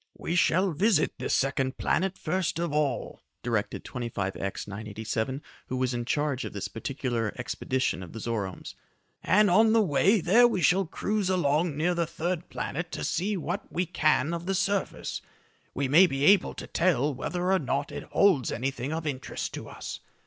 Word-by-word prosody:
"We 170 - -3
shall 185 +2 +3
visit 195 +7 +2
the - - -3
second 135 -1 0
planet 190 +1 0
first 180 +1 -1
of 170 -3 -2
all," 150 -3 -1 0.2
directed 115 -4 -1
25X 100 -6 -4
987, 110 +5 -4 0.2
who 130 - -3
was 130 0 0
in 120 -1 -3
charge 145 0 0
of - - -6
this 100 - -3
particular 120 -3 -3
expedition 130 -2 -1
of 90 - -9
the - - -8
Zoromes, 105 -5 -4 0.5
"and 210 +2 +4
on 220 +4 +5
the 225 - +5
way 195 +6 +3
there 220 +8 +6
we 190 -7 -1
shall 185 +3 +3
cruise 205 +2 -1
along 155 -3 +1
near 170 +4 +2
the 170 -1 0
third 170 +1 -3
planet 165 +3 -4
to - - -4
see 200 +3 0
what 175 +4 -4
we 180 +2 0
can 155 -2 +2
of 170 +1 -5
the 195 - +1
surface. 195 +1 -1 0.5
We 140 0 0
may 165 +8 +7
be 135 -3 -2
able 195 +1 +5
to - - -7
tell 150 -5 +1
whether 180 +7 -2
or 190 - +4
not 140 -1 -2
it - - -6
holds 170 - +3
anything 130 +2 -3
of 160 0 -3
interest 135 -3 -4
to - - -7
us. - - -7
155 Hz, 180 wpm, -28 LUFS, 130-185 Hz, 0.5 s, may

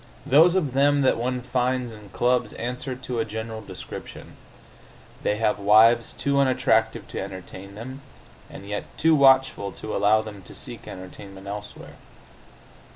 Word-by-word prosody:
Those 165 +6 +6
of 150 -9 0
them 145 +1 +3
that 130 - +4
one 125 +2 -2
finds 125 0 -1
in 105 -2 -12
clubs 125 +5 +1
answer 125 +2 -4
to 125 -2 -5
a - - +2
general 110 0 -6
description: 95 -4 -10 0.9
they 105 - +1
have 105 -2 +1
wives 110 +3 +5
too 140 0 0
unattractive 130 -4 +2
to - - -5
entertain 95 +1 -9
them, 130 +5 -8 0.5
and 100 - -11
yet 105 0 -3
too 160 +1 +4
watchful 135 -7 +4
to 110 - -6
allow 110 +2 +3
them 105 -2 -9
to - - -14
seek - - -8
entertainment 95 +1 -10
elsewhere. 105 +1 -8
115 Hz, 150 wpm, -24 LUFS, 105-130 Hz, 0.9 s, Those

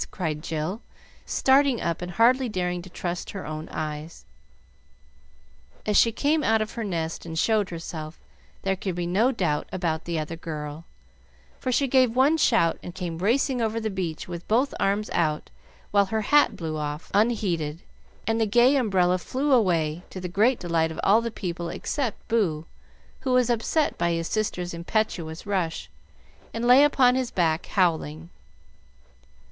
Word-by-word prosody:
cried 155 -5 -3
Jill, 160 +8 -3 0.5
starting 270 -2 +3
up 170 0 -2
and 180 0 -5
hardly 245 +5 +4
daring 180 -3 -2
to 185 - -12
trust 175 0 -4
her 195 - -6
own 155 +1 -6
eyes. 155 +1 -6 1.6
As 210 - 0
she 230 - +5
came 300 +6 +1
out 225 0 +3
of 215 0 -2
her 230 - -4
nest 165 -5 -3
and 165 -1 -6
showed 210 +2 +2
herself, 165 -2 -7 0.4
there 195 0 +1
could 190 -1 -4
be 175 0 -2
no 205 +9 +2
doubt 170 - -1
about 165 -3 -2
the 170 -1 -2
other 155 +1 -3
girl, 155 -1 -6 0.7
for 255 - -2
she 275 +3 +2
gave 255 -2 +3
one 275 +5 +4
shout 225 - +3
and 175 - -9
came 170 -3 -4
racing 245 +5 +1
over 225 0 0
the 220 -1 -2
beach 175 -5 -4
with 175 -1 -7
both 250 +6 +2
arms 200 +2 0
out, 155 -2 0 0.4
while 200 -1 +4
her 220 +3 -1
hat 290 +8 +4
blew 160 -2 -4
off 150 +1 -5
unheeded, 185 -8 0 0.4
and 225 0 0
the 220 - +2
gay 240 +6 +5
umbrella 185 -7 +2
flew 270 +9 -2
away, 170 - +2
to 185 - -7
the 180 - -4
great 220 +8 +2
delight 165 -2 0
of 160 - -7
all 210 +4 +5
the - - -7
little 230 - -4
people 170 -2 -4
except 255 - -3
Boo, 175 -9 0 0.5
who 260 - -1
was 250 -1 +3
upset 240 +7 0
by 170 0 +1
his 165 0 -2
sister's 180 -5 -2
impetuous 170 -2 -2
rush, 185 -5 -2 0.6
and 230 +1 -2
lay 250 +3 +7
upon 265 -4 +4
his 255 -1 -1
back 165 -2 0
howling. 165 -3 0
185 Hz, 170 wpm, -25 LUFS, 165-230 Hz, 1.6 s, lay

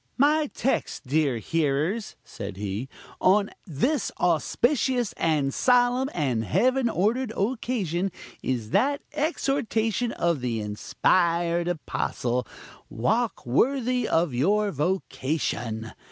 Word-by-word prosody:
"My 295 +2 +3
text, 265 - -1
dear 140 -2 +1
hearers," 160 - -1
said 100 -3 -7
he, 105 +5 -4 0.3
"on 200 +2 +3 0.2
this 235 - 0
auspicious, 240 - +1
and 150 -4 +1
solemn, 250 +1 +3
and 130 -9 0
heaven 255 - +2
ordered 225 +5 0
occasion, 200 -5 -1 0.3
is 120 -4 -2
that 280 +7 +2
exhortation 245 - 0
of 170 -5 0
the 120 -3 -1
inspired 170 - +1
apostle, 125 -7 -2 0.4
'Walk 220 - 0
worthy 250 - +1
of 165 -4 +1
your 200 +11 +2
vocation.' 135 - -2
175 Hz, 100 wpm, -26 LUFS, -, 0.4 s, My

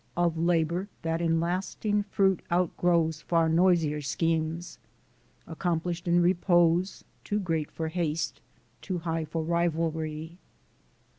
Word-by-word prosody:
Of 175 -1 +2
labor 170 +2 +1 0.2
that 165 +1 -1
in 165 -1 +2
lasting 190 +4 -1
fruit 195 -2 +1
outgrows 170 -2 +1
Far 165 0 +2
noisier 165 -3 +3
schemes, 165 +3 -2 0.7
accomplished 170 +1 -2
in 175 0 +4
repose, 175 0 +2 0.2
Too 210 - -1
great 165 -6 -1
for 160 -1 -4
haste, 160 -2 -2 0.4
too 185 -3 -3
high 165 -1 -2
for 160 +1 -3
rivalry. 160 -1 -1
170 Hz, 115 wpm, -28 LUFS, 160-175 Hz, 0.7 s, in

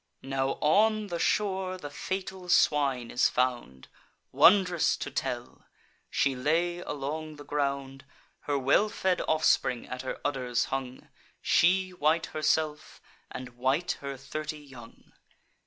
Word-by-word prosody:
Now 135 0 -1
on 215 +6 +3
the 170 -1 -3
shore 190 -2 0
the 145 -5 -8
fatal 190 +3 -5
swine 135 -8 +2
is 125 - +3
found. 120 - -2 0.5
Wond'rous 180 -3 +5
to - - -5
tell!—She 130 +1 -4
lay 165 +7 0
along 155 0 -5
the 145 0 -12
ground: 140 -1 -3 0.4
Her 145 - +2
well 140 +11 +3
fed 185 -3 0
offspring 155 -5 +2
at 125 0 -5
her 130 - -5
udders 125 -4 0
hung; 130 -1 -5 0.3
She 185 +2 +3
white 160 -1 +1
herself, 155 0 -1 0.3
and 130 -1 -7
white 130 +8 -1
her 140 -1 -5
thirty 150 +3 -5
young. 130 -6 -14
145 Hz, 125 wpm, -28 LUFS, 135-175 Hz, 0.5 s, Wond'rous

